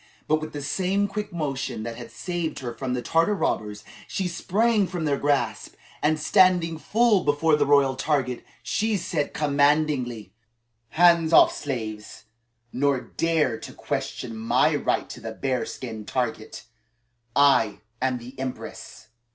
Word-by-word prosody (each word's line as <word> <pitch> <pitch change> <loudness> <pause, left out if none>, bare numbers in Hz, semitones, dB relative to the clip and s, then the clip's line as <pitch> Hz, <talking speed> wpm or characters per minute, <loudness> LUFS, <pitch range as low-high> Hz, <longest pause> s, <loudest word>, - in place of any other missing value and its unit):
But 155 0 +2
with 155 - -6
the 145 -1 -6
same 190 +6 0
quick 210 +1 -5
motion 135 -8 -3
that 115 0 -5
had - - -9
saved 175 -3 -4
her 120 -2 -5
from 125 0 -3
the 125 - -3
Tartar 165 +6 +2
robbers, 105 - -2 0.2
she 190 - -2
sprang 205 +4 +1
from 175 -3 -4
their 140 -2 0
grasp 135 -6 -1 0.3
and, 155 +1 +2
standing 170 0 +3
full 220 0 +3
before 150 +2 +3
the 150 - +1
royal 140 -2 +4
target, 130 -3 -1 0.2
she 215 0 0
said 160 -4 -2
commandingly: 140 - +1 0.6
"Hands 170 +2 +4
off, - - +6
slaves; 110 -7 -5 0.5
nor 140 0 +1
dare 155 -5 0
to - - -9
question 115 - -4
my 110 +1 +2
right - - 0
to - - -9
the - - -6
bearskin 125 -4 -4
target. 115 -3 -3 0.7
I 125 -8 +4 0.2
am 130 -1 +1
the 120 +2 -10
Empress!" 130 -4 -7
145 Hz, 145 wpm, -25 LUFS, 125-165 Hz, 0.7 s, off